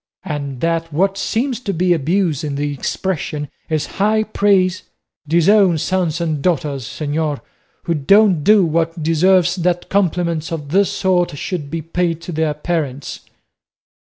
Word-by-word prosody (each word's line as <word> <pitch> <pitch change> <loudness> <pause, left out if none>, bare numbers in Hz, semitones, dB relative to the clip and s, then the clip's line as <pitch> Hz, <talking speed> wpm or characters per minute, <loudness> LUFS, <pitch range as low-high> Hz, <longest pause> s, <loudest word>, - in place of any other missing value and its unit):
and 140 -4 -5
that 165 0 -1
what 190 +6 +1
seems 235 +5 -1
to 225 -5 -3
be 180 0 +2
abuse 165 0 0
in 145 -2 -3
the 145 +1 -2
expression 150 0 -3 0.2
is 155 -2 0 0.2
high 215 +1 +3
praise? 195 -4 +2 0.5
Disown 170 +3 +4
sons 175 0 -1
and 160 -4 -2
daughters, 140 -6 -1
señor, 150 +1 -2 0.4
who 170 - 0
don't 185 +2 +4
do 210 -1 +5
what 165 0 -1
deserves 175 +2 +3
that 175 0 -1
compliments 170 -4 0
of 150 -4 -5
this 195 +5 +3
sort 180 -5 0
should 155 -3 -4
be 165 +1 -4
paid 165 0 -1
to 170 - -7
their 155 -2 -1
parents." 150 -4 -3
170 Hz, 145 wpm, -18 LUFS, 150-185 Hz, 0.5 s, do